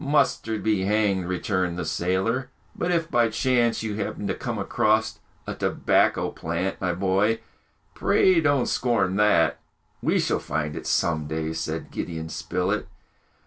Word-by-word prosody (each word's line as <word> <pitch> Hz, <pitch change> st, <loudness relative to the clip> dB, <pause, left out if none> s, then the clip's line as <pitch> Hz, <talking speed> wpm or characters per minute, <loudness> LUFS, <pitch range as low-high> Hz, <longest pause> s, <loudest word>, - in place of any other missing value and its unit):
"Mustard 115 Hz, -6 st, +1 dB
be 105 Hz, -3 st, +1 dB
hanged!" 100 Hz, -3 st, +1 dB
returned 90 Hz, -1 st, -1 dB
the 90 Hz, -, -3 dB
sailor; 95 Hz, +10 st, 0 dB, 0.3 s
"but 175 Hz, -, -2 dB
if 170 Hz, -2 st, 0 dB
by 120 Hz, -3 st, +3 dB
chance 120 Hz, 0 st, +1 dB
you 105 Hz, -2 st, -3 dB
happen 105 Hz, 0 st, -3 dB
to -, -, 0 dB
come 120 Hz, -3 st, -4 dB
across 110 Hz, +2 st, +1 dB, 0.3 s
a -, -, -4 dB
tobacco -, -, +1 dB
plant, 85 Hz, +4 st, -3 dB
my 90 Hz, -2 st, +1 dB
boy, 95 Hz, +5 st, +1 dB, 0.5 s
pray 185 Hz, -3 st, +3 dB
don't 145 Hz, -5 st, +2 dB
scorn 105 Hz, -7 st, +1 dB
that!" 105 Hz, -6 st, +3 dB, 0.4 s
"We -, -, +2 dB
shall -, -, +1 dB
find 75 Hz, 0 st, -3 dB
it -, -, -6 dB
some 80 Hz, -3 st, +1 dB
day!" 80 Hz, +1 st, -2 dB
said 80 Hz, 0 st, -4 dB
Gideon 80 Hz, -2 st, -4 dB
Spilett. 90 Hz, +6 st, -2 dB
100 Hz, 145 wpm, -25 LUFS, 85-115 Hz, 0.5 s, by